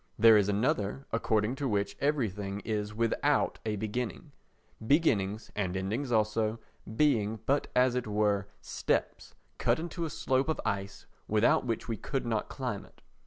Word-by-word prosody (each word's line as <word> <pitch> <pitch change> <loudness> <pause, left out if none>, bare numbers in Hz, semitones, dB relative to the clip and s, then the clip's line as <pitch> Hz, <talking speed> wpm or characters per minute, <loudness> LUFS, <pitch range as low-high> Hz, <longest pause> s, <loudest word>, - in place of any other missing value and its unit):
There 115 0 +8
is 105 -1 +4
another 110 +3 0
according 110 0 +1
to 140 - -1
which 100 -3 -1
everything 105 -9 -1
is 105 -1 -2
without 115 +1 +1
a 110 -1 -1
beginning—beginnings, 110 - -2
and 95 -3 -1
endings 110 +8 -2
also, 110 0 +1 0.4
being, 110 -6 +2
but 140 +2 +1
as 125 0 +4
it 125 -2 -2
were, 105 -1 +1
steps - - -2 0.2
cut - - +2
in 165 +2 -5
a 165 - -2
slope 135 0 0
of 160 - 0
ice 100 -1 -3 0.2
without 110 +4 +3
which 115 -2 -2
we 115 -2 -2
could 135 +2 -3
not 110 -2 -1
climb 125 -7 -4
it. - - -21
110 Hz, 150 wpm, -30 LUFS, 105-125 Hz, 0.4 s, There